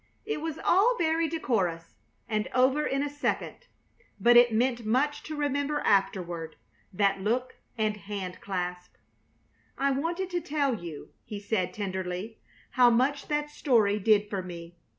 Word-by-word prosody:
It 435 Hz, -8 st, -3 dB
was 320 Hz, -1 st, -4 dB
all 450 Hz, +7 st, +3 dB
very 325 Hz, -1 st, +1 dB
decorous, 190 Hz, -, -1 dB, 0.3 s
and 215 Hz, -2 st, -1 dB
over 265 Hz, +4 st, +3 dB
in 275 Hz, +1 st, 0 dB
a -, -, -1 dB
second, 290 Hz, -, -3 dB, 0.5 s
but 240 Hz, 0 st, +5 dB
it 240 Hz, 0 st, +7 dB
meant 240 Hz, +1 st, +1 dB
much 265 Hz, +7 st, +1 dB
to 310 Hz, -, -5 dB
remember 290 Hz, 0 st, -1 dB
afterward, 175 Hz, -5 st, 0 dB, 0.4 s
that 195 Hz, 0 st, +1 dB
look 245 Hz, +5 st, -1 dB, 0.2 s
and 215 Hz, -1 st, 0 dB
hand 195 Hz, -2 st, -6 dB
clasp. 180 Hz, -2 st, -4 dB, 0.8 s
"I 275 Hz, +1 st, +2 dB
wanted 340 Hz, +7 st, -2 dB
to 350 Hz, -1 st, -1 dB
tell 290 Hz, -4 st, 0 dB
you," 170 Hz, -8 st, -7 dB
he 210 Hz, -, -7 dB
said, 200 Hz, -3 st, -1 dB
tenderly, 190 Hz, +1 st, -4 dB, 0.3 s
"how 250 Hz, -1 st, +6 dB
much 260 Hz, +4 st, +1 dB
that 295 Hz, 0 st, -1 dB
story 220 Hz, -8 st, +2 dB
did 210 Hz, 0 st, +3 dB
for 200 Hz, -2 st, -3 dB
me. 170 Hz, -1 st, -9 dB
230 Hz, 150 wpm, -28 LUFS, 195-290 Hz, 0.8 s, it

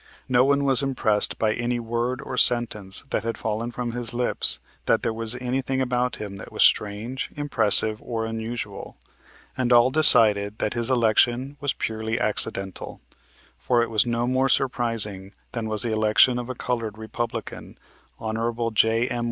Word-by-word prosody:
No 125 Hz, -1 st, +3 dB
one 140 Hz, +1 st, +1 dB
was 135 Hz, -3 st, +4 dB
impressed 120 Hz, -6 st, +1 dB
by 110 Hz, -1 st, 0 dB
any 120 Hz, +1 st, -3 dB
word 120 Hz, +2 st, -3 dB
or 130 Hz, -, -6 dB
sentence 115 Hz, -6 st, +2 dB
that -, -, -2 dB
had 115 Hz, 0 st, -4 dB
fallen 110 Hz, +2 st, -4 dB
from 120 Hz, 0 st, -5 dB
his 120 Hz, -1 st, -5 dB
lips 125 Hz, 0 st, +1 dB, 0.3 s
that -, -, +1 dB
there 115 Hz, -, -1 dB
was 115 Hz, +1 st, -4 dB
anything 130 Hz, +1 st, -3 dB
about 125 Hz, -1 st, -1 dB
him 100 Hz, -2 st, -8 dB
that 95 Hz, -, -11 dB
was -, -, +1 dB
strange, 110 Hz, +5 st, 0 dB
impressive 110 Hz, -6 st, +5 dB
or 115 Hz, -2 st, -4 dB
unusual, 115 Hz, +1 st, -6 dB, 0.6 s
and 125 Hz, -1 st, -2 dB
all 120 Hz, +1 st, +5 dB
decided 105 Hz, -8 st, +6 dB
that 105 Hz, -, -2 dB
his 120 Hz, 0 st, -2 dB
election 120 Hz, +2 st, +1 dB
was 145 Hz, -1 st, -2 dB
purely 110 Hz, 0 st, -4 dB
accidental; 95 Hz, -2 st, -2 dB, 0.6 s
for 120 Hz, -2 st, +1 dB
it 115 Hz, -, -6 dB
was 110 Hz, +2 st, +1 dB
no 120 Hz, 0 st, -1 dB
more 130 Hz, +2 st, 0 dB
surprising 115 Hz, -7 st, -1 dB, 0.2 s
than 115 Hz, -2 st, -5 dB
was 110 Hz, +1 st, +2 dB
the 115 Hz, -2 st, -2 dB
election 110 Hz, +3 st, +3 dB
of 120 Hz, 0 st, -7 dB
a 130 Hz, -, -5 dB
colored 115 Hz, -4 st, -4 dB
Republican, 110 Hz, +2 st, -7 dB, 0.4 s
Hon. 115 Hz, +1 st, -3 dB
J.M. 115 Hz, +3 st, +1 dB
115 Hz, 160 wpm, -23 LUFS, 110-125 Hz, 0.6 s, decided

